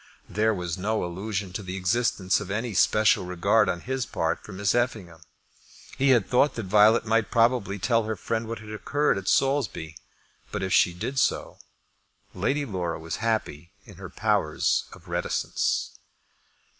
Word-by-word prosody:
There 110 +1 +1
was 90 -3 -3
no 110 +3 -1
allusion 95 +1 -4
to 105 - -4
the 95 -1 -6
existence 95 0 +1
of 105 -3 -7
any 115 +3 -2
special 110 +2 +3
regard 95 +4 +2
on 85 -1 -2
his 130 0 -3
part 80 0 -2
for - - -10
Miss 100 +1 0
Effingham. 105 -9 -2 0.7
He 135 +1 +2
had 120 -7 +4
thought 130 +4 +3
that 115 - -4
Violet 105 +4 +5
might 115 0 +1
probably 115 -4 +2
tell 115 +3 +1
her 110 0 -2
friend 110 +4 -3
what 115 +1 -4
had 105 +1 -10
occurred 145 +2 0
at 95 - -11
Saulsby; 115 - 0 0.6
but 105 -2 -3
if 95 - -1
she 85 - +4
did 130 +9 -3
so, - - 0 0.7
Lady 145 +1 -1
Laura 90 -7 -3
was 80 +1 -5
happy 100 -7 -2
in - - -14
her - - -8
powers 75 0 0
of - - -15
reticence. - - -1
105 Hz, 165 wpm, -26 LUFS, 90-115 Hz, 0.7 s, Violet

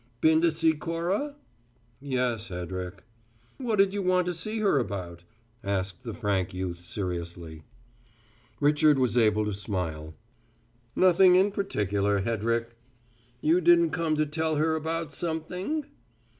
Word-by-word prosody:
"Been 160 0 +4
to 170 - +4
see 160 0 +2
Cora?" 170 - -2 0.6
"Yes, 125 -5 -1
Hedrick." 90 +1 -6 0.6
"What'd 210 -6 +2
you 205 - -1
want 185 -1 +2
to 180 - -1
see 215 +7 -2
her 200 -9 +2
about?" 90 -7 -5 0.4
asked 95 -2 -2
the 115 -3 -6
frank 95 -5 -1
youth 90 -2 -4
seriously. 85 -3 -5 1.0
Richard 150 0 +4
was 125 -2 +1
able 110 -3 +3
to 105 - -2
smile. 85 -6 -4 0.8
"Nothing 185 0 +6
in 195 +3 +4
particular, 105 - 0
Hedrick." 115 +2 -1 0.7
"You 165 +4 +3
didn't 170 -1 +5
come 165 -2 0
to 155 0 +1
tell 160 +1 -1
her 160 +2 +1
about 160 0 -3
something?" 180 - -3
145 Hz, 130 wpm, -27 LUFS, -, 1.0 s, Nothing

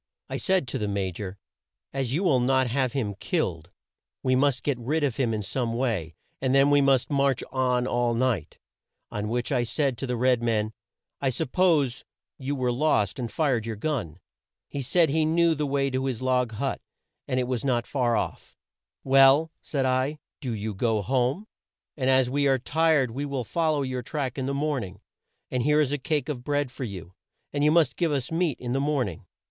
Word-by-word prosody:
I - - -2
said 185 -7 +1
to - - -3
the 105 - -1
Ma 100 -2 -1
jor; 95 +2 -7 0.6
'As 135 -3 -1
you 165 +8 0
will 150 -9 +4
not 130 +1 +3
have 125 0 0
him 110 -7 -1
killed, 95 - -2 0.5
we 130 -1 +3
must 135 -1 +2
get 140 -4 0
rid 150 +6 -1
of 135 -5 0
him 125 -4 +1
in 110 -1 -2
some 115 +3 -2
way, 105 -11 -1 0.3
and 130 0 +2
then 140 +1 +5
we 145 0 +5
must 135 0 +3
march 140 -2 +2
on 125 -1 +1
all 120 -2 +1
night;' 115 - -1 0.5
on 105 0 -3
which 120 +3 -2
I 125 -3 +2
said 130 0 -1
to 135 - -3
the 125 - -1
red 125 0 +3
man, 110 -2 0 0.5
'I 135 - +2
suppose 145 -1 +1 0.4
you 140 +1 -2
were 125 -2 0
lost 120 -6 +1
and 120 -3 -3
fired 120 -3 0
your 115 - -3
gun.' 105 - -3 0.5
"He 140 - -4
said 160 +3 +2
he 160 +1 +2
knew 165 +1 +3
the 150 -1 -2
way 140 0 0
to 130 +1 -1
his 130 -4 -2
log 125 -2 +1
hut 135 +5 -2 0.5
and 130 - 0
it 125 - -1
was 125 -3 -2
not 120 -4 +1
far 120 -4 +1
off. - - -5 0.5
'Well,' 135 +4 +5
said 135 -3 -1
I, 130 +3 +1 0.2
'do 130 - -4
you 105 0 -4
go 110 +1 0
home; 130 - 0 0.5
and 130 -3 0
as 130 -1 +4
we 140 +2 +1
are 135 -1 +4
tired 150 -1 +2
we 135 +5 -4
will 140 -3 -2
fol 160 - 0
low 145 - 0
your 130 -1 -3
track 135 0 -3
in 130 - -2
the 140 - -1
morn 145 -2 0
ing, 95 +1 -9 0.5
and 125 - 0
here 150 +4 +3
is 145 -3 +2
a 145 - -1
cake 150 0 -1
of 135 -5 -4
bread 145 -1 -1
for 130 - -5
you, 95 -4 -8 0.4
and 145 0 0
you 150 - +5
must 155 -4 +3
give 170 -3 +1
us 135 -1 -2
meat 165 -4 0
in 120 -1 -3
the 135 - +1
morn 140 -4 +1
ing.' 85 - -11
130 Hz, 210 wpm, -26 LUFS, 120-145 Hz, 0.6 s, then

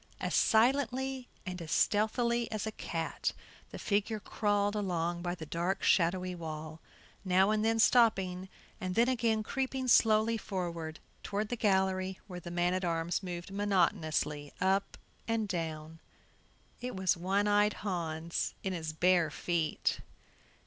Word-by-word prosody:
As - - -2
silently 260 +2 +2 0.2
and 180 -2 -5
as 165 - -7
stealthily 235 +3 +2
as 215 -1 -2
a 220 - -2
cat 165 -5 -3 0.4
the - - -8
figure 210 +2 0
crawled 205 0 0
along 175 -4 -1
by 175 0 -2
the 160 - -8
dark 170 +5 -2
shadowy 180 +1 +2
wall, 160 -2 -6 0.4
now 190 +1 +4
and 215 0 +1
then 225 0 +2
stopping, 190 -6 +3 0.3
and 185 -1 -3
then 235 +1 +4
again 225 -4 +1
creeping 265 +2 -2
slowly 225 -1 +4
forward 170 -6 -4 0.2
toward 205 +1 -2
the 245 - -1
gallery 190 -3 +1
where 180 -3 -7
the 175 - -8
man 175 +1 +1
at 185 +1 -1
arms 170 +1 -1
moved 180 0 -6
monotonously 155 -7 0
up 195 +2 +1 0.3
and 225 -2 0
down. 160 -3 -4 0.8
It 250 -2 -5
was 190 -1 +2
One 195 +4 0
eyed 205 0 +4
Hans 170 -3 -2
in 190 - -1
his 160 -3 -4
bare 175 0 +3
feet. 165 +1 -1
190 Hz, 140 wpm, -32 LUFS, 170-215 Hz, 0.8 s, now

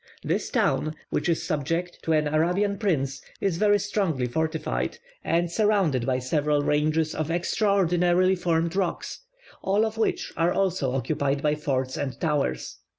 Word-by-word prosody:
This - - -1
town, 155 0 +1 0.2
which 150 +3 0
is 165 - +1
subject 165 +3 -2
to 160 - 0
an 155 -1 +2
Arabian 180 +7 +1
prince, 140 -9 0 0.2
is 190 -4 0
very 205 +1 +4
strongly 195 -9 -1
fortified, 160 - -2 0.3
and 170 +1 +1
surrounded 190 - +2
by 130 -1 +2
several 145 +3 0
ranges 155 +2 +1
of 155 0 -3
extraordinarily 180 0 +2
formed 170 -1 0
rocks, 190 -3 -2 0.4
all 200 +3 +2
of 220 0 -4
which 225 - -1
are 170 +1 +2
also 180 -9 0
occupied 140 +1 -1
by 150 0 +3
forts 130 -4 -2
and 130 -4 -4
towers. 150 -4 -1
165 Hz, 150 wpm, -26 LUFS, 150-185 Hz, 0.4 s, very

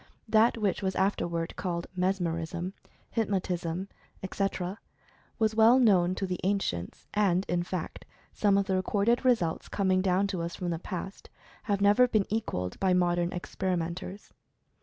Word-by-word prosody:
That 220 +2 +4
which 210 -3 0
was 190 -1 -1
afterward 170 -4 -1
called 170 -2 -3
Mes 185 +2 +1
merism, 170 +1 -3 0.4
Hypnotism, 185 -4 -1 0.4
etc., 190 0 -2 0.6
was 220 -1 +2
well 225 +3 +6
known 185 -7 +4
to 195 - -2
the 180 -1 -3
an 200 +2 +2
cients, 85 - -4
and, 195 -3 +2
in 175 0 0
fact, 175 -1 -5 0.3
some 200 -2 +3
of 200 - +2
the 190 -1 0
recorded 205 +5 +1
results 225 -11 +1
com 195 -2 0
ing 185 0 +3
down 190 +1 +2
to 195 -3 -2
us 170 0 -4
from 175 -1 -3
the 165 - -2
past, 190 +1 -7 0.4
have 200 -1 +1
never 205 +5 +5
been 215 -5 +2
equalled 90 - -2
by 185 -2 +3
modern 175 -1 +1
experimentors. 180 +1 -4
190 Hz, 160 wpm, -29 LUFS, 175-205 Hz, 0.6 s, well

